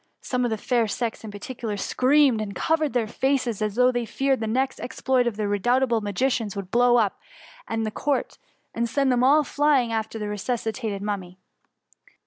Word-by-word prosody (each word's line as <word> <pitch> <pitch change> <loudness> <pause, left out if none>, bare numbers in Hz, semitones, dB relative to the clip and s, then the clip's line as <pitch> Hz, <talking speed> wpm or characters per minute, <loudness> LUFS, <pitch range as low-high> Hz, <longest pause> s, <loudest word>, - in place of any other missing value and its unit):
Some 250 -1 -1
of 245 - +1
the 220 - -1
fair 235 +1 +1
sex 225 +3 -3
in 220 - -7
par 205 - -8
ticular 220 -2 -5
screamed 260 0 +3
and 200 -2 -5
covered 315 - 0
their 240 -3 +1
faces, 245 -1 -1
as 210 -1 -1
though 250 +1 +4
they 245 -2 -2
feared 270 +2 0
the 220 - -2
next 260 +4 -1
exploit 255 -1 0
of 220 -4 -2
the 210 -1 -1
re 205 0 0
doubtable 240 0 +2
magicians 210 +1 -1
would 200 -1 -4
be - - -26
to - - -41
blow 245 0 +4
up 215 -4 +1 0.5
the 225 -1 -1
court, 285 +5 -2 0.3
and 235 0 -1
send 275 +1 +1
them 245 0 +2
all 295 +4 +5
flying 285 -4 +2
after 220 0 -3
the 210 - -4
resus 210 +3 -3
citated 220 -3 -3
Mummy. 195 -3 -4
235 Hz, 205 wpm, -24 LUFS, 215-260 Hz, 0.5 s, all